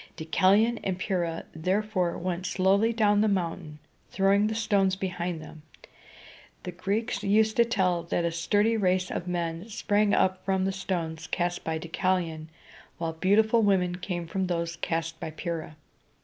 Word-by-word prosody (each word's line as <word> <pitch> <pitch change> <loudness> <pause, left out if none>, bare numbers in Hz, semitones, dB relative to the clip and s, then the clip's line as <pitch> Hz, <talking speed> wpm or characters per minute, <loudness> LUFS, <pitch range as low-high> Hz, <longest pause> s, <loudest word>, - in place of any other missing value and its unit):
Deucalion 200 +8 +3
and 190 -2 -1
Pyrrha, 175 -4 -2
therefore, 185 +2 0
went 180 +1 -3
slowly 195 +4 +2
down 210 -2 +3
the 215 - +3
mountain, 170 -5 -2 0.3
throwing 200 +2 +3
the 220 - -2
stones 200 -3 +2
behind 180 -3 -3
them. 155 0 -12 1.0
The 180 - -5
Greeks 200 +5 -2
used 215 +2 +3
to 235 - +6
tell 185 -7 +1
that 170 0 -1
a 170 - 0
sturdy 205 +7 +1
race 185 -2 +1
of 175 - -4
men 170 +2 -3
sprang 205 -1 +1
up 185 0 +1
from 190 -1 0
the 195 - +1
stones 170 -4 -4
cast 175 -1 -2
by 160 0 -2
Deucalion, 165 -1 -2 0.5
while 165 -1 -3
beautiful 215 +7 +3
women 185 -4 +2
came 180 -2 -4
from 190 +3 -2
those 170 -1 -2
cast 165 -1 -3
by - - -4
Pyrrha. 155 0 -5
185 Hz, 155 wpm, -27 LUFS, 170-200 Hz, 1.0 s, to